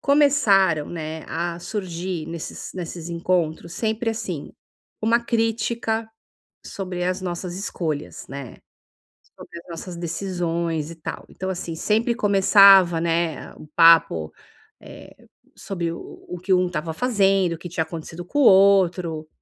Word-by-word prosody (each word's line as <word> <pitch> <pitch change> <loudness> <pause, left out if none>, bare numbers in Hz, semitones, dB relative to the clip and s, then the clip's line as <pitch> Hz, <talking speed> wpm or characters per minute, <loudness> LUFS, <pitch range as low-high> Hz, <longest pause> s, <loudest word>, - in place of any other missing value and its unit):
Começaram, 220 - +3
né, 160 -1 -6
a 170 0 -3
surgir 180 -4 -4
nesses 165 -1 -7
nesses 170 -2 -6
encontros, 170 -1 -1
sempre 220 +3 -1
assim, 205 -9 -5 0.5
uma 230 +2 +3
crítica 225 -1 -1 0.6
sobre 185 -2 -5
as 185 +1 -1
nossas 180 0 -4
escolhas, 160 -6 -4
né, 135 -3 -8 0.8
sobre 170 - -11
as 175 - -22
nossas 170 +1 -7
decisões 170 -2 -2
e - - -8
tal. 155 - -7
Então 190 0 -5
assim, 175 -3 -4
sempre 225 +7 +1
começava, 195 -5 +6
né, 165 -1 -1
a - - -17
o - - -12
papo, 125 - +5 0.5
eh, - - -14 0.3
sobre 170 -4 -4
o 170 - -7 0.3
o 180 - -6
o - - -9
que 185 +1 +2
um 180 0 +3
estava 165 -2 -3
fazendo, 195 -5 +2
o 160 - -9
que 175 - -8
tinha 165 -1 -1
acontecido 165 +1 -8
com 290 - -4
o - - +5
outro 180 -6 +4
175 Hz, 140 wpm, -23 LUFS, 165-195 Hz, 0.8 s, começava